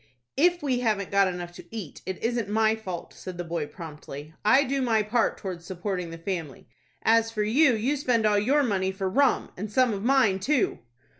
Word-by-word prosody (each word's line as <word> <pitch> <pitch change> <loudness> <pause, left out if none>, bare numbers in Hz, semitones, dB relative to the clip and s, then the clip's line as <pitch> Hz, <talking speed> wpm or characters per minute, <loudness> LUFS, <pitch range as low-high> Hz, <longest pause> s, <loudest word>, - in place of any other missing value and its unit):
"If 350 +3 +3
we 260 -4 +1
haven't 215 -5 0
got 200 -1 +4
enough 175 -1 -5
to 175 - -12
eat, 210 -10 -7
it 190 -1 -3
isn't 230 -3 -1
my 220 +1 +3
fault," 185 -6 -7
said 185 -2 -8
the 175 - -3
boy, 165 -3 -3
promptly. 150 -2 -9
"I 260 +7 +5
do 275 0 -1
my 225 -4 +2
part 225 +2 +1
towards 180 -3 -6
supporting 180 0 -4
the 165 - -7
family. 165 -5 -5 0.4
As 225 0 +4
for 215 -2 -1
you, 255 +4 +4
you 245 +7 0
spend 245 -5 +1
all 210 -1 +4
your 275 +8 +3
money 190 -6 0
for 190 0 -3
rum, 270 +8 +2
and 205 +3 -6
some 250 0 +3
of 195 - -4
mine 240 -7 +3
too." 265 +5 +1
210 Hz, 205 wpm, -26 LUFS, 185-245 Hz, 0.4 s, I